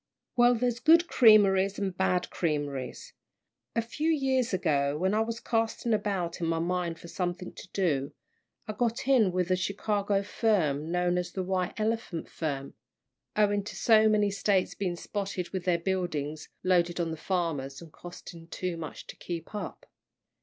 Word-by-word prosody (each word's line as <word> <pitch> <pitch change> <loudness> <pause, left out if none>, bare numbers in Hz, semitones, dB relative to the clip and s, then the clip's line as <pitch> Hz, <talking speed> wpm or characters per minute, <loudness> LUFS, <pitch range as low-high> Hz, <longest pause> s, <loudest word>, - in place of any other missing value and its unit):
"Well, 245 0 +5
there's 240 0 0
good 330 +5 +5
creameries 200 -4 +5
and 195 -2 -2
bad 180 -1 0
creameries. 145 -5 -3 0.6
A 230 - +1
few 300 +8 -2
years 265 -5 +1
ago, 145 -6 +1
when 190 +4 +1
I 215 - +2
was 225 +1 -1
casting 225 0 0
about 195 -5 -1
in 165 - 0
my 165 0 +1
mind 170 0 -1
for - - -11
something 180 +1 -4
to - - -11
do, 150 -7 0 0.6
I 215 - -3
got 240 +3 -1
in 240 -8 +4
with 180 0 0
a - - +5
Chicago 200 +1 0
firm 170 -9 0
known 180 0 +1
as 180 - -4
the 190 - -2
White 185 +1 -2
Elephant 215 -6 -2
firm 140 -4 -4 0.6
owing 205 -1 +2
to 210 - -8
so 220 -1 +5
many 210 -1 +3
States 195 -1 +1
being 185 -3 -2
spotted 195 -1 -4
with 190 -2 -4
their 180 -2 +3
buildings, 165 -5 -3
loaded 175 -1 +2
on 165 -1 -1
the - - -3
farmers, 155 -6 -2
and 165 -2 -13
costing 175 -1 -11
too 180 0 -4
much 160 -2 -7
to - - -10
keep 170 +2 -6
up. 210 - -6
185 Hz, 165 wpm, -29 LUFS, 170-215 Hz, 0.6 s, Well